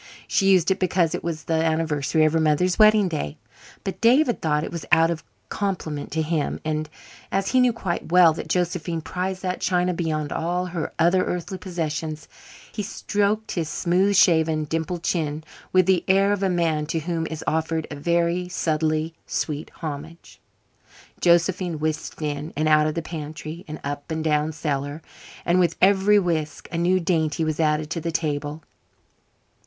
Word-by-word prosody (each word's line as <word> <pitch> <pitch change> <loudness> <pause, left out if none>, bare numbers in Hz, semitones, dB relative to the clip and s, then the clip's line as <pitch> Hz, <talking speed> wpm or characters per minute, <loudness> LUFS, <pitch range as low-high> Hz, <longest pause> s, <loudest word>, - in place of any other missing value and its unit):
She 195 -2 +2
used 185 -1 +4
it 190 - +1
because 180 -3 +1
it - - -4
was 160 -2 -3
the 160 0 0
anniversary 160 -1 +1
of 155 - +2
her 165 - +3
mother's 160 +4 +2
wedding 215 -2 +6
day, 150 - -4 0.5
but 195 - -5
David 245 +2 +4
thought 150 -1 +1
it - - -5
was 170 -2 -5
out 165 +1 +5
of 160 -2 -4 0.3
compliment 175 -8 -3
to 160 0 0
him. 155 -2 -1
And, 155 0 -2 0.4
as 195 0 0
he 260 - +3
knew 250 -1 +5
quite 185 -7 -4
well 175 -2 +7
that - - -6
Josephine 175 -2 -1
prized 185 +3 -4
that 185 0 -2
china 180 0 +1
beyond 155 -3 -2
all 175 +2 -1
her 175 -3 -4
other 175 +3 +3
earthly 180 +2 -4
possessions, 160 -4 -4 0.4
he 215 - -4
stroked 205 +1 -1
his 165 -4 -2
smooth 185 +6 +1
shaven, 160 -4 +4
dimpled 165 +3 -3
chin 155 -3 -1 0.3
with 185 -1 +4
the 190 -1 +3
air 195 +1 +4
of 205 - -2
a 195 - +2
man 165 -4 0
to 165 0 -1
whom 165 0 -2
is 160 -1 -6
offered 160 0 0
a - - -4
very 170 +3 0
subtly 155 -1 0
sweet 150 -1 -3
homage. 155 +2 -7 0.8
Josephine 175 0 +2
whisked 155 +1 -3
in 150 +1 -3
and 155 +1 +1
out 155 0 +5
of 155 - -2
the 170 - -2
pantry, 155 +1 -7
and 155 0 -7
up 145 +2 -5
and 160 0 -2
down 150 0 +1
cellar, 145 0 -3 0.4
and 175 +1 +3
with 170 -2 +2
every 200 +2 +5
whisk 160 -6 -1
a 170 - -3
new 180 +2 +3
dainty 165 -3 0
was 155 -1 -2
added 155 -1 +1
to 165 - -2
the 165 +1 -2
table. 150 -1 -2
165 Hz, 175 wpm, -24 LUFS, 155-180 Hz, 0.8 s, well